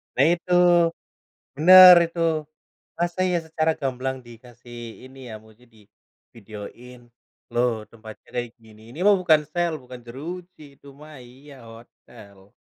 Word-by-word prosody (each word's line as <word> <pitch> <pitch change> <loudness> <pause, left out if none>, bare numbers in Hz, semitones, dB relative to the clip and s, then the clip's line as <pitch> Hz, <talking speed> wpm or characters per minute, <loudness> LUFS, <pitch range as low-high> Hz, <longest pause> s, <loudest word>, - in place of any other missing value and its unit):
Nah, 135 - +3
itu. 180 +1 -5 1.0
Bener, 185 +3 +9
itu. 170 +1 -10 0.8
Masa 175 +1 -3
iya 180 - 0
secara 160 0 -1
gamblang 130 0 -4
dikasih 120 0 -15 0.3
ini 130 +1 -17
ya, - - -9
maksudnya 110 +3 -23
divideoin, 110 +3 -15 0.5
loh, 120 +1 +1 0.2
tempatnya 110 -1 -15
kayak 120 -1 -4
gini. 110 -2 -20
Ini 150 - -13
mah 205 - +6
bukan 160 -4 +3
sel, 175 -1 -1
bukan 125 0 -12
jeruji 170 +8 -10 0.2
itu - - -22
mah, 155 +1 -14
iya, 135 +4 -17 0.2
hotel. 105 -3 -18
125 Hz, 130 wpm, -22 LUFS, 115-160 Hz, 1.0 s, Bener